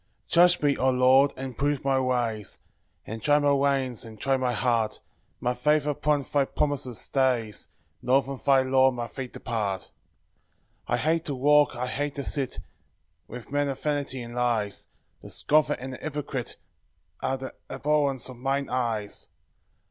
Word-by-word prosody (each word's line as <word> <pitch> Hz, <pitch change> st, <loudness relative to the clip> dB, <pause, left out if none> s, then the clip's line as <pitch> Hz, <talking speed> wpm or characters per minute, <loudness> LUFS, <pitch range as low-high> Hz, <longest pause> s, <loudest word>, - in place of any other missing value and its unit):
1 -, -, -46 dB, 0.2 s
Judge 175 Hz, 0 st, +1 dB
me, 145 Hz, -1 st, +3 dB
O 130 Hz, -, +2 dB
Lord, 130 Hz, +2 st, +5 dB
and 130 Hz, -2 st, -6 dB
prove 145 Hz, -1 st, 0 dB
my 135 Hz, -1 st, +3 dB
ways, 120 Hz, -5 st, -1 dB, 0.5 s
And 110 Hz, +1 st, -6 dB
try 145 Hz, +4 st, +4 dB
my 145 Hz, -1 st, +3 dB
reins, 135 Hz, -3 st, +1 dB
and 110 Hz, -2 st, -11 dB
try 135 Hz, +3 st, +2 dB
my 130 Hz, -1 st, 0 dB
heart; 115 Hz, -2 st, 0 dB, 0.4 s
My 125 Hz, -, 0 dB
faith 150 Hz, +4 st, +2 dB
upon 150 Hz, 0 st, +1 dB
thy 140 Hz, +1 st, +1 dB
promise 140 Hz, -5 st, -1 dB
stays, 125 Hz, -6 st, 0 dB, 0.3 s
Nor 130 Hz, +2 st, +3 dB
from 135 Hz, -1 st, -7 dB
thy 135 Hz, -2 st, +5 dB
law 130 Hz, 0 st, +4 dB
my 120 Hz, -2 st, -4 dB
feet 130 Hz, +1 st, -7 dB
depart. 105 Hz, -5 st, -3 dB, 1.0 s
2 -, -, -2 dB
I -, -, +3 dB
hate 160 Hz, +2 st, +1 dB
to 145 Hz, -, -2 dB
walk, 145 Hz, +1 st, +4 dB
I 125 Hz, +1 st, -2 dB
hate 145 Hz, +3 st, -3 dB
to 140 Hz, -, -3 dB
sit, 135 Hz, -1 st, -1 dB, 0.7 s
With 120 Hz, +1 st, -9 dB
men 145 Hz, 0 st, +1 dB
of 135 Hz, -, -4 dB
vanity 145 Hz, -4 st, -2 dB
and 120 Hz, 0 st, -9 dB
lies; 120 Hz, -4 st, -1 dB, 0.3 s
The -, -, -10 dB
scoffer 155 Hz, 0 st, +2 dB
and 130 Hz, +1 st, -6 dB
the -, -, -6 dB
hypocrite 145 Hz, -4 st, -4 dB, 0.7 s
Are 135 Hz, -, 0 dB
the 130 Hz, 0 st, -7 dB, 0.2 s
abhorrence 145 Hz, -3 st, 0 dB
of 130 Hz, -2 st, -10 dB
mine 135 Hz, +2 st, -1 dB
eyes. 115 Hz, -5 st, -2 dB
130 Hz, 170 wpm, -26 LUFS, 125-145 Hz, 1.0 s, Lord